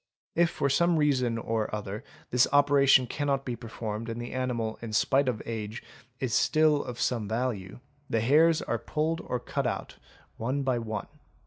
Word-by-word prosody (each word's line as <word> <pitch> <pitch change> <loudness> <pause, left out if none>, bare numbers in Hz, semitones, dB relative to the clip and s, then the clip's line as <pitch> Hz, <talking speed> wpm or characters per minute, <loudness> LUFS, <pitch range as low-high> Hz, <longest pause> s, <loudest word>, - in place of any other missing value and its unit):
If 170 0 +3
for 140 - -1
some 170 +5 +3
reason 130 -6 +2
or 115 -1 -1
other, 105 +1 -5 0.3
this 125 +1 +4
opera 145 -1 +4
tion 130 -1 +7
cannot 140 +1 -1
be 125 - -2
performed 115 -1 -5
and 115 +1 -4
the 120 0 -5
animal 120 -4 -2
in 115 -2 -6
spite 135 +4 +3
of 115 -4 -3
age 110 0 -5 0.4
is 130 -4 -2
still 155 -2 +3
of 120 -1 -7
some 115 -5 0
value, 110 -3 -3 0.3
the 115 - +1
hairs 155 +7 +4
are 120 - -1
pulled 160 +6 -1
or 125 - -3
cut - - -2
out - - -4 0.4
one 130 +5 -1
by 130 -3 +1
one. 110 -2 -4
125 Hz, 180 wpm, -28 LUFS, 115-140 Hz, 0.4 s, tion